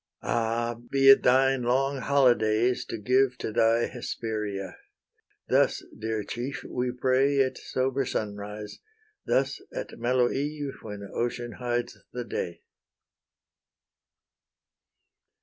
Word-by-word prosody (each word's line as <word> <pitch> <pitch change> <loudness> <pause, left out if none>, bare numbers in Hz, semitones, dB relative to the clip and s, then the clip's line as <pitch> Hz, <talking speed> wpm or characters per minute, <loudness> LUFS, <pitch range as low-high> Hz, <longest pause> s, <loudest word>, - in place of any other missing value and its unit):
Ah! 115 0 0 0.2
be 135 0 +5
it 135 - +7
thine 135 +1 +4
long 135 +3 +1
holydays 120 -3 +3
to - - -4
give 125 +4 +2
To 110 - -4
thy 115 +1 +3
Hesperia! 105 -5 -4 0.7
thus, - - +2
dear 110 -1 -3
chief, 125 +6 -5
we 125 0 -2
pray 130 +3 +2
At 130 - -4
sober 130 +1 -1
sunrise; 105 -2 -5 0.5
thus - - +1
at - - -6
mellow 120 +1 +2
eve, 145 0 -3
When 105 -2 -7
ocean 120 0 -2
hides 120 -1 -2
the 125 - -3
day. 85 -6 -5
120 Hz, 110 wpm, -27 LUFS, 110-135 Hz, 0.7 s, it